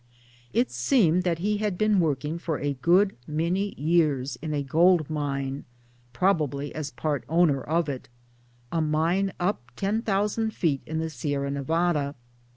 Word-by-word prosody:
It 120 0 +1
seemed 170 - +3
that 170 -2 +1
he 205 +5 0
had 205 -3 -1
been 215 -1 +3
working 155 0 0
for 165 -3 -2
a 145 0 -1
good 180 +9 +3
many 170 +6 -1
years 145 -4 +1
in 155 0 -4
a 145 -1 -1
gold 160 +2 +3
mine 140 -2 -2 0.5
(probably 145 -2 0
as 155 -2 -4
part 150 -2 -2
owner 160 -4 +3
of 165 +4 0
it) 135 -4 -5 0.6
a 165 - +1
mine 165 +6 +1
up 180 - 0
10,000 210 - 0
feet 145 -6 0
in 160 - -3
the 160 0 -2
Sierra 140 0 -2
Nevada. 150 0 0
160 Hz, 150 wpm, -26 LUFS, 140-180 Hz, 0.6 s, seemed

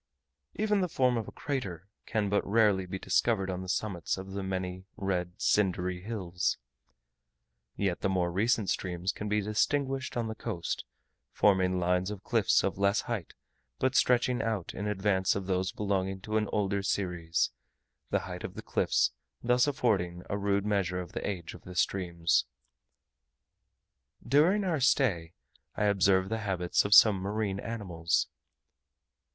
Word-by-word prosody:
Even 210 -2 +1
the 180 - 0
form 130 -6 +2
of 115 -3 -2
a - - -7
crater 100 - -4 0.2
can 110 -3 0
but 100 +1 +1
rarely 100 -3 +3
be 95 - -4
discovered 95 +1 +1
on 90 0 -4
the 95 - -7
summits 95 -3 -1
of 95 +1 -7
the 100 +1 -3
many 95 -1 -4
red 90 -3 -2
cindery 90 -3 +1
hills; 90 -4 -2 1.2
yet 95 -3 -1
the 95 - +1
more 90 -2 +1
recent 105 +3 +1
streams 90 0 -1
can 105 -1 -5
be 105 0 +2
distinguished 130 +6 0
on 115 -1 -1
the 110 - -3
coast, 85 -5 -4 0.5
forming 95 -2 +3
lines 90 +1 +1
of 105 -2 -7
cliffs 115 -4 +3
of 95 - -1
less 100 +1 +3
height, 110 -8 -5 0.4
but 130 0 +1
stretching 125 -1 +3
out 110 -6 -2
in 105 - -4
advance 95 -2 +1
of 100 -1 -3
those 95 0 0
belonging 95 -2 -1
to 110 +3 -5
an 105 -1 +2
older 100 -1 0
series: 90 -4 -1 0.6
the - - +1
height - - -7
of - - -6
the - - -7
cliffs - - +1 0.3
thus 125 +2 +3
affording 95 -11 0
a - - +1
rude 100 0 0
measure 95 -4 0
of 90 -1 -7
the - - -3
age 90 -5 -5
of - - -12
the 90 - -10
streams. 85 -3 +1 1.8
During 160 - +4
our 170 -5 0
stay, 105 - +2 0.4
I - - -1
observed 95 -2 +3
the 110 0 -1
habits 95 -4 0
of 100 0 +5
some 105 -2 +8
marine 100 +1 -2
animals. 95 -7 -1
100 Hz, 155 wpm, -30 LUFS, 90-110 Hz, 1.8 s, some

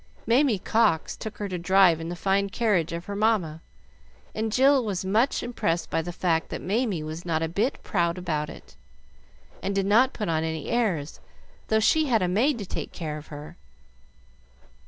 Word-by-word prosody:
Mamie 245 -1 +3
Cox 180 -5 +1
took 220 - -7
her 205 - -3
to 180 -2 -4
drive 180 -2 +4
in 165 - -5
the 175 - -4
fine 195 +2 +1
carriage 195 -7 +1
of 170 +1 -5
her 200 - -5
mamma, 200 -7 +1 0.7
and 220 0 -2
Jill 265 +3 +4
was 195 -4 -3
much 220 +8 +1
impressed 175 -8 -2
by - - +1
the 175 +2 -5
fact 170 -2 0
that - - -4
Mamie 205 -5 -1
was 155 +2 -6
not 165 -2 -1
a - - 0
bit 205 - -1
proud 170 -2 0
about 155 -4 -2
it, - - -13 0.9
and 195 +1 -2
did 195 -1 +1
not 235 +6 +4
put 210 - -4
on 160 -1 0
any 160 -2 -4
airs, 190 -11 -1 0.5
though 220 - +3
she 310 +8 +3
had 225 -6 +2
a - - +1
maid 235 +10 +2
to 205 - -5
take - - -5
care 155 -3 -5
of 150 - -14
her. 150 0 -10
190 Hz, 190 wpm, -26 LUFS, 165-220 Hz, 0.9 s, drive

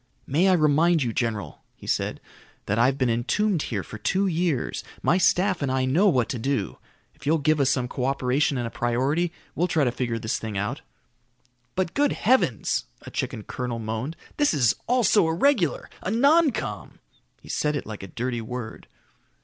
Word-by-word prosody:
"May 160 +8 +2
I - - +5
remind 160 0 +3
you, 120 -2 -2
general," 115 -4 -3
he - - -14
said, - - -1 0.5
"that 100 +3 0
I've 130 +3 +3
been 130 - +1
entombed 170 - +1
here 105 -9 -3
for 110 - -9
two 190 - +1
years. 170 -7 -1 0.2
My 180 - +3
staff 185 0 +2
and 140 -2 0
I 130 0 +1
know 165 +11 +3
what 125 -8 +2
to 125 - -3
do. 135 +4 -2 0.3
If - - -12
you'll 160 +2 +4
give 155 +1 +2
us 135 -2 +3
some 130 -2 0
co 125 +1 -3
operation 135 +1 +1
and 120 - -2
a 115 - -5
priority, 135 +9 0 0.2
we'll 175 - +1
try 160 -4 +2
to 125 - +2
figure 120 -2 -2
this 110 -1 -2
thing 110 -3 -5
out." 105 +1 -2 0.9
"But 185 -2 -1
good 290 0 +2
heavens," 225 - +1 0.2
a - - -10
chicken 105 - -3
colonel 125 0 -4
moaned, 115 +7 -4 0.2
"this 290 - +3
is 125 -6 +4
all 250 0 +2
so 205 -4 +4
irregular. 180 - +2
A - - -3
noncom!" 280 - +2 0.4
He - - -16
said 150 0 0
it 145 - -3
like 110 -1 -7
a 95 - -7
dirty 120 +3 -3
word. 115 0 -7
140 Hz, 190 wpm, -25 LUFS, 120-175 Hz, 0.9 s, I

